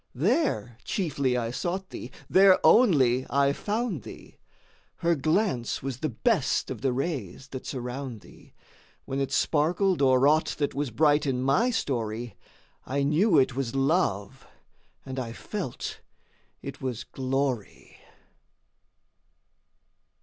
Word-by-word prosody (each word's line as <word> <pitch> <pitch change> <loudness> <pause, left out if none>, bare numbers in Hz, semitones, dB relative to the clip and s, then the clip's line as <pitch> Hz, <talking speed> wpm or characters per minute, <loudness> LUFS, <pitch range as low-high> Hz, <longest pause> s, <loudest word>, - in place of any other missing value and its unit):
4. 140 - -4
There 240 - +1
chiefly 140 -9 -1
I 115 -1 -2
sought 185 +8 -3
thee, - - -7 0.2
there 190 0 +6
only 135 - +5
I 140 0 +3
found 210 - -2
thee; - - -12 0.6
Her 170 0 +1
Glance 155 - 0
was 135 -2 -4
the 155 - -1
best 115 - 0
of - - -6
the 135 -1 +1
rays 130 - -4
that 130 -1 -7
surround 125 -2 -5
thee, - - -18 0.5
When 135 - -3
it 135 - -1
sparkled 175 +4 +1
o'er 130 0 +5
aught 155 +2 +2
that 145 -2 -1
was 145 -1 -2
bright 145 +4 +3
in 130 -1 0
my 185 - +3
story, 120 - -2 0.5
I 140 +2 -1
knew 160 +6 +3
it 135 -2 +3
was 135 -1 -3
Love, 135 - 0 0.6
and 130 0 -5
I 115 -3 -4
felt 185 - -5 0.6
it - - -7
was 125 -4 -3
Glory. 130 -3 -3
140 Hz, 130 wpm, -27 LUFS, 125-170 Hz, 0.6 s, there